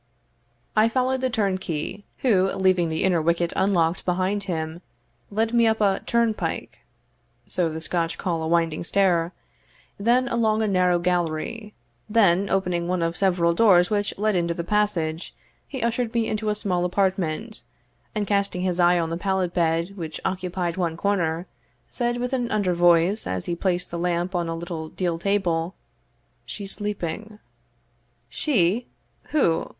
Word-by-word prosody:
I 215 +1 +5
followed 255 +2 0
the 260 - +1
turnkey, 190 -4 -2 0.2
who, 195 -7 +3
leaving 185 -3 +2
the 160 0 -1
inner 180 -3 +3
wicket 170 +1 +1
unlocked 175 -3 +2
behind 190 +3 0
him, 160 -2 -3 0.5
led 225 +3 0
me 235 -1 +4
up 220 0 +2
a 200 -2 +2
turnpike 235 -2 -1 0.7
(so 175 -3 0
the 160 0 -5
Scotch 165 0 -1
call 170 -3 -2
a 160 - -2
winding 165 -1 +1
stair), 175 -2 +2 0.7
then 240 +5 +3
along 220 -2 +1
a - - +1
narrow 180 -2 +3
gallery 175 +5 -2 0.3
then 200 -3 +3
opening 180 -3 0
one 180 -1 0
of 165 +1 -1
several 175 -3 +2
doors 180 -2 +5
which 205 -1 0
led 215 0 +1
into 170 -1 0
the 170 - -3
passage, 175 -5 -1 0.3
he 265 -5 -5
ushered 235 0 -1
me 230 -1 +2
into 215 0 -1
a 210 - +1
small 185 -4 -1
apartment, 185 - -1 0.5
and 210 -1 0
casting 200 -2 0
his 180 -1 0
eye 175 0 +5
on 165 -1 -1
the 165 - -2
pallet 190 -1 -1
bed 170 +2 0
which 160 -3 -5
occupied 180 -2 -2
one 170 -3 -1
corner, 175 -4 0 0.5
said 240 0 -1
with 250 +2 -3
an 245 -2 0
under 200 -4 +1
voice, 175 +4 +3
as 95 -1 -3
he 175 - -2
placed 180 0 -1
the 170 - -3
lamp 175 +1 -1
on 175 -2 -1
a 165 - -2
little 165 -2 -5
deal 175 -2 -2
table, 180 -2 0 0.7
"She's 200 -2 -5
sleeping." 210 +1 -4 0.9
"She! 225 - +1 0.4
who? 170 - +1
185 Hz, 155 wpm, -24 LUFS, 170-210 Hz, 0.9 s, I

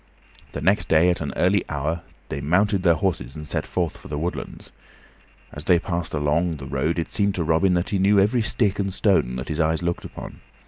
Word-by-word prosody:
The - - -4
next 100 +3 +2
day 85 +3 +4
at 90 - -3
an 70 -3 -3
early - - +2
hour 75 +4 -2 0.3
they 70 - -4
mounted 95 +6 +2
their 85 -2 +4
horses 75 -7 -2
and 75 -1 -8
set - - -2
forth 85 -4 -1
for - - -12
the 75 +2 -4
woodlands. 85 +4 -5 0.8
As 75 - -8
they 90 - +5
passed 85 -2 -3
along 80 +4 +1
the 70 - -8
road 70 +5 -1
it 85 - -3
seemed 100 -1 +1
to 85 - -1
Robin 85 +4 +2
that 90 +2 -1
he 100 - +1
knew 100 +2 +4
every 110 +5 +3
stick 105 -3 0
and 100 -1 -1
stone 95 - +2
that 65 +1 -5
his 75 - -3
eyes 80 +2 +1
looked 85 0 -2
upon. - - -9
85 Hz, 220 wpm, -23 LUFS, 75-95 Hz, 0.8 s, they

